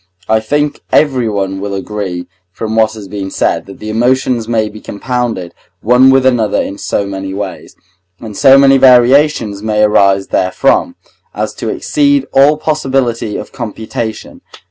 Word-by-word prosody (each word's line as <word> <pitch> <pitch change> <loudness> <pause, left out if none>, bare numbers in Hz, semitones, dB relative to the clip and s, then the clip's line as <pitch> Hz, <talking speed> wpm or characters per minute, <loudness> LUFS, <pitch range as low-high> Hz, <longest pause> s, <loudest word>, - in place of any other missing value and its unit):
I 110 0 +2
think 145 +7 -2
everyone 105 -9 0
will 100 0 -4
agree 95 -3 -5 0.3
from 110 +3 -5
what 110 -1 +2
has 105 -3 -9
been 95 0 -5
said, - - -1
that 100 - -11
the 110 0 -6
emotions 120 0 0
may 110 -2 0
be 105 0 -11
compounded 115 -5 -4 0.3
one 125 +4 +4
with 135 0 +3
another 115 -5 +1
in 100 - -4
so 100 - -2
many 95 -1 -6
ways, 100 -2 -7 0.4
and 110 -3 -9
so 135 +5 +6
many 135 0 +5
variations 125 -4 +4
may 105 0 0
arise 100 -2 +3
therefrom, 135 - +1 0.4
as - - -3
to - - -5
exceed 285 -2 +1
all 145 +3 +4
possibility 135 -8 -1
of - - -8
computation. 110 0 -6
110 Hz, 150 wpm, -13 LUFS, 100-130 Hz, 0.4 s, so